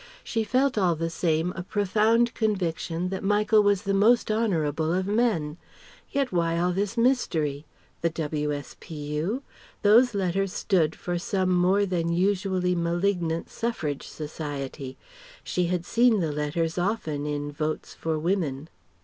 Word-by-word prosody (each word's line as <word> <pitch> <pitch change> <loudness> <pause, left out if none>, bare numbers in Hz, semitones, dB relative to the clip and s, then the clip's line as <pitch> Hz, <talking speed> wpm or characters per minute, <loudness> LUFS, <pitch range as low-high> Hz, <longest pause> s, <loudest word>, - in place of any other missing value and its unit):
She 225 -1 -1
felt 255 +2 +1
all 180 -4 +3
the 165 +1 -2
same 165 +1 0
a 185 - -4
profound 215 +5 +2
conviction 180 -5 -1
that 190 +1 -4
Michael 210 +2 +4
was 205 -1 +2
the 200 -1 0
most 220 +3 +4
honourable 165 -8 0
of 185 +2 0
men. 200 -8 0 0.5
Yet 275 -2 0
why 170 -2 +1
all 175 +1 +1
this 200 +5 -2
mystery? 160 - +1 0.3
The 170 - +2
W.S.P.U.? 150 - -3 0.4
Those 230 +3 +5
letters 195 0 0
stood 160 -5 +1
for 175 -1 -3
some 185 +1 0
more 185 +3 +3
than 170 -3 -1
usually 185 0 +1
malignant 170 -1 -1
Suffrage 160 -12 -3
Society. 145 -3 -6 0.5
She 180 -1 0
had 175 -1 -1
seen 235 0 +3
the 160 -4 0
letters 160 +3 -1
often 160 -7 -1
in 145 0 -3
"Votes 155 +1 -3
for 160 -1 -2
Women."... 160 -4 -1
180 Hz, 140 wpm, -26 LUFS, 160-205 Hz, 0.5 s, Those